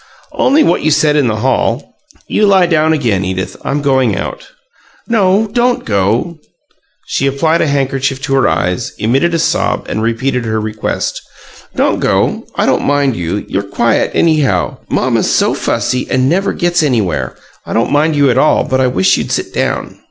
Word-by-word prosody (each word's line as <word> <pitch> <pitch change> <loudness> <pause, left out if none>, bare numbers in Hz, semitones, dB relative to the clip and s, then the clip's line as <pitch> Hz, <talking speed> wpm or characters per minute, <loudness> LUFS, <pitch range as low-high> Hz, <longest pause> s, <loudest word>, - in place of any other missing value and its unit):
"Only 295 +4 +3
what 175 - +1
you 155 - +1
said 150 0 +2
in 145 -4 +2
the 110 - 0
hall. 130 -1 0 0.3
You 210 - +2
lie 190 -2 +4
down 160 -2 +2
again, 115 -11 0
Edith. 95 0 -3
I'm 145 +1 -2
going 130 -6 +2
out." - - -6 0.6
"No; 205 -2 +2
don't 245 0 +1
go." 115 - 0 0.7
She 135 - -1
applied 160 +5 +1
a - - +1
handkerchief 135 -1 -1
to 135 - -2
her 135 - +3
eyes, 90 +6 -1
emitted 135 +11 +1
a - - +2
sob, - - 0
and 110 - -3
repeated 120 +3 -1
her 110 -1 -1
request. 110 0 -3 0.5
"Don't - - +1
go. - - 0
I - - +1
don't - - +1
mind 140 -3 +1
you; 90 +4 -3
you're 100 - -1
quiet, 110 +3 0
anyhow. 145 - +1
Mamma's - - 0
so - - +2
fussy, 125 0 -2
and 130 0 +1
never 185 +7 +1
gets 175 0 +1
anywhere. 105 - -1 0.3
I - - -4
don't 115 +1 0
mind 150 +2 +2
you 140 -2 +3
at 125 - +1
all, 155 - +3
but 130 0 0
I 130 - +3
wish 95 -5 +2
you'd - - -4
sit - - -2
down." - - -2
135 Hz, 180 wpm, -14 LUFS, 110-155 Hz, 0.7 s, lie